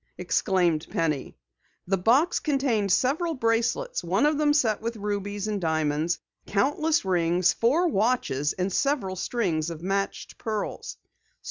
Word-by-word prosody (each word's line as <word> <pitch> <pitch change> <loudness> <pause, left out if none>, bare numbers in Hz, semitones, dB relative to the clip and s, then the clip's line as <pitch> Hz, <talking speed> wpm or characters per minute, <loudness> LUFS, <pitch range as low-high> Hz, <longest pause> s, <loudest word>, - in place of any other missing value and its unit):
exclaimed 175 -3 +1
Penny. 155 -5 -2 0.5
The 195 +1 0
box 255 - +3
contained 265 - 0
several 310 - +1
bracelets, 245 - 0
one - - +1
of 300 0 +2
them 300 -1 +3
set 235 -9 +2
with 230 +1 -3
rubies 205 -1 -3
and 210 -2 -2
diamonds, 160 0 0 0.3
countless 295 +8 +1
rings, 175 -1 +2
four 295 +10 +2
watches, 205 - 0
and 185 0 -2
several 260 -9 0
strings 175 -6 -1
of 165 -1 -8
matched 195 +1 -3
pearls. 215 -2 -4
205 Hz, 130 wpm, -26 LUFS, 180-265 Hz, 0.5 s, box